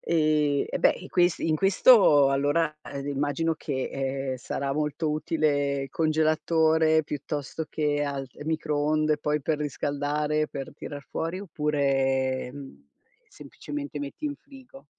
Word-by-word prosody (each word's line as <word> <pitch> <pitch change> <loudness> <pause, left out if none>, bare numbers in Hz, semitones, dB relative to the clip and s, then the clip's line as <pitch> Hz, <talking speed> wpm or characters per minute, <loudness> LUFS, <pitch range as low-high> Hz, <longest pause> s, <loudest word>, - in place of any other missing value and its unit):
ehm, 150 -3 +2
e - - -2
beh, - - +5
e 185 - -10
questi 175 -2 +2
in 155 - +2
questo 190 - +6
allora 145 +3 +1 0.3
immagino 145 +3 -1
che, 135 -4 -3
ehm, 135 -1 -2
sarà 135 +2 -3
molto 150 +2 -1
utile 145 -3 0
congelatore, 160 0 +2
piuttosto 150 +1 -5
che 145 -2 0
al 140 -2 -4
ehm, 145 - -10
microonde 155 -1 +1
poi 150 0 -1
per 155 +1 0
riscaldare, 150 +1 -1
per 135 -2 -7
tirar 145 -1 -8
fuori, 165 +3 -3
oppure, 135 -6 0
mhmm, 135 - -11 0.4
semplicemente 145 0 -7
metti 145 - -7
in 290 -1 -4
frigo. 270 -1 -15
150 Hz, 130 wpm, -26 LUFS, 140-160 Hz, 0.4 s, questo